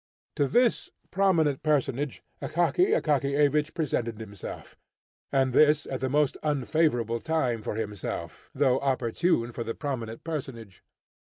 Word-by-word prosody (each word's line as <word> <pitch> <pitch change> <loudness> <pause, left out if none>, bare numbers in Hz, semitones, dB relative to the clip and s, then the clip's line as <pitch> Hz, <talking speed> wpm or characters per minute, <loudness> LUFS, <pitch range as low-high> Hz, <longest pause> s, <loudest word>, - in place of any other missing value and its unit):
To 140 - +2
this 240 - +2 0.2
prominent 170 -8 +2
personage 145 -2 0 0.2
Akaky 355 - +2
Akakiyevich 145 +1 +1
presented 120 -8 -2
himself, 105 -3 -8 0.6
and 135 -2 +2
this 150 +2 +5
at 130 - -4
the 130 - -1
most 145 +1 +2
unfavourable 140 -5 +1
time 130 -7 0
for 105 - -4
himself, 105 -3 -5
though 130 -2 +3
opportune 130 0 0
for 120 - -4
the 115 0 -4
prominent 120 -6 -4
personage. 125 - -6
140 Hz, 120 wpm, -27 LUFS, 120-155 Hz, 0.6 s, this